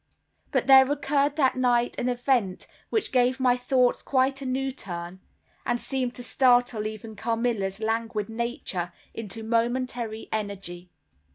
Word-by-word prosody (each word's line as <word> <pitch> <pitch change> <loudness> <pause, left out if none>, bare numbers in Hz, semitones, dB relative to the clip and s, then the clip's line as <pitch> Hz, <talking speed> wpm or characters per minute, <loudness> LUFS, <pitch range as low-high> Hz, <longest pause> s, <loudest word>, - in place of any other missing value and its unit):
But - - +1
there 265 0 +7
occurred 285 0 +1
that 270 -4 +3
night 245 -1 +2
an 250 - 0
event 245 -6 0 0.2
which 440 - 0
gave 255 0 +2
my 250 -1 +4
thoughts 250 0 +2
quite 270 +1 +1
a 270 - -4
new 265 +1 -1
turn, 175 -7 -7 0.4
and 240 0 0
seemed 255 -2 -2
to 245 - -8
startle 245 -2 +3
even 220 0 -8
Carmilla's 225 -3 -1
languid 225 -1 -1
nature 225 -6 -3 0.2
into 225 0 -6
momentary 235 0 -1
energy. 195 -4 -4
240 Hz, 140 wpm, -26 LUFS, 220-260 Hz, 0.4 s, there